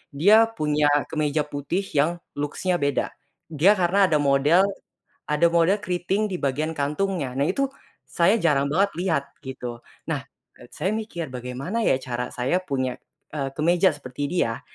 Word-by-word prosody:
dia 210 +9 +6
punya 150 -8 0 0.2
kemeja 150 -1 0
putih 145 +6 -3
yang 150 +4 +2 0.2
looks-nya 175 +5 -1
beda. 140 -1 0 0.4
Dia 170 +7 +5
karena 190 +1 +3
ada 160 - +1
model 145 +5 +4 0.6
ada 150 +3 +3
model 170 +5 +2
keriting 190 +4 -1
di 185 - -3
bagian 155 +2 -1
kantungnya. 150 0 -1
Nah 140 +3 0
itu, 275 +8 +1 0.4
saya 170 - +3
jarang 145 -8 +2
banget 195 +7 +2
lihat, 165 -6 +1 0.2
gitu. 125 -4 -7 0.2
Nah, - - -2 0.3
eee, - - -16
saya 190 +3 -2
mikir, 175 - -5
"Bagaimana 125 - -4
ya 170 - +3
cara 125 -2 -4
saya 130 +9 -1
punya, 130 -7 -2 0.4
eee, 140 -3 -2
kemeja 175 +4 +4
seperti 145 -2 -5
dia?" 115 -10 -1
155 Hz, 150 wpm, -24 LUFS, 140-185 Hz, 0.6 s, dia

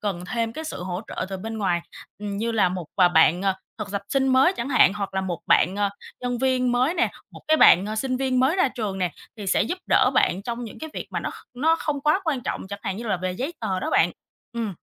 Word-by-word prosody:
cần 190 -4 -3
thêm 230 +1 -2
cái 315 +6 -6
sự 315 - -5
hỗ 180 0 -3
trợ - - -4
từ 195 - -4
bên 220 +3 -6
ngoài, 180 -4 +1 0.4
như 210 +3 -3
là 205 -5 +3
1 180 -3 -5
à, 180 -2 +6
bạn, 175 +1 +4
à, 190 -1 +1 0.2
thực 210 -2 -5
tập 200 - -2
sinh 270 -1 +1
mới 265 +7 +5
chẳng 245 -7 -4
hạn 195 -8 +5
hoặc 200 -2 -4
là 190 - +1
1 180 -3 -4
bạn, 185 +4 +4
ờ, 205 0 +2 0.3
nhân 245 -1 -2
viên 255 -1 +1
mới 255 +7 +2
nè, - - +1 0.2
1, - - -11
cái 315 - +5
bạn, 190 - +7
ờ, 215 - -4
sinh 255 +2 -1
viên 260 -1 +1
mới 275 +8 +3
ra 280 - +3
trường 215 -7 -4
nè 180 -4 -1 0.2
thì 205 - -7
sẽ 185 - +3
giúp 355 +11 -3
đỡ - - +4
bạn 190 +3 +2
trong 240 +1 -4
những 220 - -9
cái 315 0 -7
việc - - -5
mà - - -2
nó - - -3
kh - - -14
nó 320 +5 +3
không 295 -3 -2
quá 305 +6 +2
quan 290 -6 0
trọng 210 - -4
chẳng 200 - -6
hạn 190 - -3
như 235 - -6
là 195 -4 0
về 185 +1 -3
giấy 265 - -3
tờ 190 -4 -1
đó - - -2
bạn. 175 - +4 0.4
Ừm. 225 -5 -3
220 Hz, 270 wpm, -24 LUFS, 190-260 Hz, 0.4 s, bạn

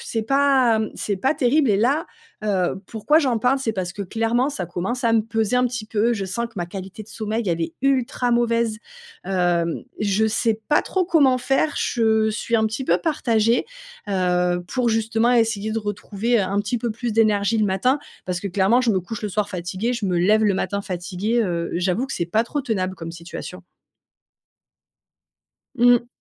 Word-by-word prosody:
c'est 225 - -2
pas, 265 -2 +3
mmh, 220 -1 -2
c'est 200 -2 -2
pas 265 +10 +1
terrible. 275 -1 +2
Et 200 - +3
là, 270 +10 +1 0.4
heu, 190 -2 0
pourquoi 240 +8 +2
j'en 260 -7 +1
parle? 250 +5 +2
C'est 240 -4 -2
parce 185 -3 -3
que 205 - -5
clairement, 225 +6 0
ça 195 -11 -4
commence 190 +9 -3
à 230 -2 +2
me 225 - +4
peser 225 +1 0
un 250 0 +3
petit 240 -3 -5
peu. 225 +2 +1
Je 200 -4 -2
sens 220 +6 -3
que 230 - -19
ma 175 -2 -2
qualité 190 +3 -8
de 215 - -16
sommeil, 220 +1 -3
elle 170 -1 0
est 165 0 -3
ultra 255 -2 +1
mauvaise. 235 -2 +1 0.5
Hem, 175 -3 0 0.2
je 210 +1 +1
sais 220 0 0
pas 295 - +4
trop 375 -1 0
comment 290 -7 +3
faire. 270 +4 +1
Je 220 -2 +2
suis 220 +2 -3
un 220 -1 +3
petit 225 +5 -4
peu - - +3
partagée. 235 -7 +1 0.4
Heu, 180 -2 +1
pour 250 +1 0
justement 225 +1 +1
essayer 225 -3 +1
de 225 - 0
retrouver, 210 +3 -1
heu, - - +2
un 195 +2 -1
petit 210 +4 -2
peu 235 +1 -2
plus 235 +1 -3
d'énergie 215 -1 +2
le 215 - +3
matin. 205 +8 +1 0.3
Parce 180 -1 -2
que 200 - -4
clairement, 195 +6 +3
je 240 - +2
me 190 -3 +1
couche 215 +4 -7
le 210 - -2
soir 205 +1 -1
fatiguée, 190 +5 -3
je 235 -4 -4
me 180 -2 +1
lève 215 +5 +3
le 205 - +3
matin 200 +1 -2
fatiguée, 190 +5 -2
heu, 170 -4 -2
j'avoue 180 +8 0
que 270 - -6
c'est 170 - -2
pas 215 +6 +1
trop 290 +5 -3
tenable 190 -8 -2
comme 165 -2 -7
situation. 170 +2 -8 2.1
Mmh 245 -1 +5
mh. 235 - -19
220 Hz, 200 wpm, -22 LUFS, 190-240 Hz, 2.1 s, Mmh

